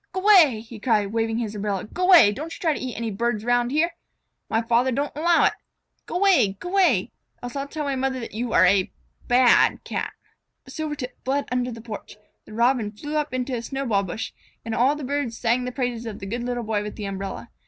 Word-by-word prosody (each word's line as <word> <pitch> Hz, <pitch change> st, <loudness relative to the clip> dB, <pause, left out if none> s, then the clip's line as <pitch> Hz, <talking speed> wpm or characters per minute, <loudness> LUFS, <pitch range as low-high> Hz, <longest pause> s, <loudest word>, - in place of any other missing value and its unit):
"G'way!" 370 Hz, -, +5 dB
he 230 Hz, -1 st, -11 dB
cried, 210 Hz, -3 st, +1 dB
waving 225 Hz, 0 st, 0 dB
his 225 Hz, -3 st, -3 dB
umbrella. 205 Hz, -2 st, -3 dB
"G'way! 350 Hz, -, +5 dB
Don't 310 Hz, +8 st, -6 dB
you -, -, -13 dB
try 320 Hz, -3 st, +1 dB
to -, -, -5 dB
eat 255 Hz, -2 st, -5 dB
any 230 Hz, -1 st, -3 dB
birds 215 Hz, +1 st, -1 dB
'round 245 Hz, 0 st, +2 dB
here. 310 Hz, +5 st, +1 dB, 0.6 s
My 225 Hz, +1 st, +1 dB
father 240 Hz, +3 st, +2 dB
doesn't 280 Hz, +4 st, -2 dB
'low 335 Hz, +2 st, +3 dB
it. -, -, +3 dB, 0.5 s
G'way! 355 Hz, -, +3 dB
G'way! 355 Hz, -, +2 dB, 0.3 s
Else 245 Hz, +1 st, -6 dB
I'll 275 Hz, 0 st, -3 dB
tell 305 Hz, +1 st, -4 dB
my 280 Hz, -2 st, -1 dB
mother 260 Hz, 0 st, -1 dB
that 230 Hz, -, -7 dB
you 230 Hz, +2 st, -3 dB
are -, -, +5 dB
a 195 Hz, -2 st, +3 dB, 0.4 s
bad 245 Hz, 0 st, +4 dB
Cat." -, -, -4 dB, 0.5 s
Silvertip 295 Hz, -5 st, -5 dB
fled 275 Hz, +2 st, 0 dB
under 250 Hz, 0 st, 0 dB
the 230 Hz, -1 st, -8 dB
porch, 215 Hz, -2 st, -9 dB, 0.3 s
the -, -, -12 dB
Robin 235 Hz, -2 st, +2 dB
flew 295 Hz, +8 st, -6 dB
up 300 Hz, -1 st, -1 dB
onto 255 Hz, +1 st, -2 dB
the 235 Hz, -, -2 dB
snowball 240 Hz, -5 st, -1 dB
bush, 200 Hz, +4 st, -5 dB, 0.3 s
and 225 Hz, -, -3 dB
all 240 Hz, +3 st, +3 dB
around 290 Hz, +2 st, +1 dB
the 300 Hz, -, -7 dB
birds 270 Hz, -4 st, -2 dB
sang 245 Hz, +1 st, +1 dB
the 250 Hz, -, -3 dB
praises 245 Hz, -2 st, -3 dB
of 215 Hz, -, -6 dB
the -, -, -8 dB
good 235 Hz, +5 st, -3 dB
Little 245 Hz, -1 st, -2 dB
Boy 215 Hz, -2 st, -1 dB
with 210 Hz, 0 st, -6 dB
the 210 Hz, -, -6 dB
umbrella. 195 Hz, -, -6 dB
245 Hz, 215 wpm, -24 LUFS, 220-280 Hz, 0.6 s, G'way